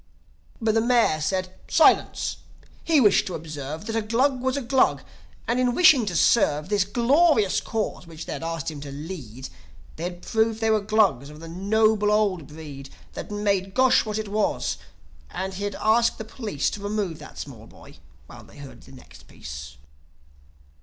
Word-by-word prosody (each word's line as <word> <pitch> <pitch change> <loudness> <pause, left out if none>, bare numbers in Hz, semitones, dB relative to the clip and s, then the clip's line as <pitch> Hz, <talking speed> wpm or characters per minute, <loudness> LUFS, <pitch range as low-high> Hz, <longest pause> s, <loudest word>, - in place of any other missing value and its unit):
But 225 -2 +1
the 225 - +3
Mayor 235 -10 +2
said: 185 +3 -2
Silence! - - +3 0.5
He 320 -3 +3
wished 210 -6 +4
to 185 - -4
observe 155 +2 -7
That 225 0 -4
a 225 - +1
Glug 250 +5 +1
was 260 +1 0
a 280 - -3
Glug; 260 +2 +2 0.4
and 240 +2 +1
in 250 -1 +1
wishing 285 -10 +6
to 175 - -2
serve 155 -4 +3
This 205 -2 +2
glorious 240 - +3
Cause, 215 -5 -4
which 160 -1 -9
they'd - - -5
asked 165 -1 -3
him 145 -2 -9
to 140 -1 -8
lead, 140 - -8 0.5
They 165 - -4
had 175 0 -6
proved 220 0 0
they 225 -1 +1
were 215 -1 +2
Glugs 200 - +2
of 150 0 -12
the 165 - -9
noble 210 +4 +2
old 200 -8 +1
breed 145 -3 -10 0.2
That - - -7
made 200 -2 -1
Gosh 260 0 +4
what 215 -1 -4
it 215 -1 -3
was... 210 +1 -1 0.5
and 190 0 -4
he'd 200 +1 -4
ask 230 +2 +2
the 220 - -7
police 215 - -3
To 205 - -7
remove 205 -5 -3
that - - -12
small - - -9
boy - - -16 0.3
while - - -13
they - - -17
heard 140 -2 -11
the - - -16
next 130 - -16
piece. 70 0 -9
205 Hz, 180 wpm, -24 LUFS, 160-225 Hz, 0.5 s, wishing